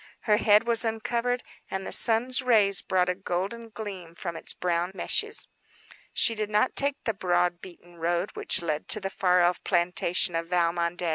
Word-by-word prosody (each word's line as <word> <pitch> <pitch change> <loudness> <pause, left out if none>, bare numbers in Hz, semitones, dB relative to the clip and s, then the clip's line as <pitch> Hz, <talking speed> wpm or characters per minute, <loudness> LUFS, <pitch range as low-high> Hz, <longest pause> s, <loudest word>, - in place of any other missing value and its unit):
Her 210 -2 +2
hair 210 0 +5
was 235 -1 +4
uncovered 235 +2 -2 0.3
and 190 0 -4
the - - -6
sun's 245 +3 +5
rays 215 -6 +3
brought 180 -1 0
a 180 - +1
golden 195 +5 -4
gleam 195 -7 -8
from 170 -1 -6
its - - 0
brown 175 0 -1
meshes. - - -1 0.6
She 230 - +2
did 215 -1 -3
not 210 +4 +1
take 280 0 0
the 225 - -1
broad, 175 -2 0
beaten 175 -1 -14
road 175 +3 -1
which - - -1
led 155 -2 -3
to 215 - +3
the 195 -1 -5
far 180 -2 +2
off 175 +1 0
plantation 175 -1 +1
of 165 0 -2
Valmondé. 170 0 0
185 Hz, 180 wpm, -26 LUFS, 175-220 Hz, 0.6 s, hair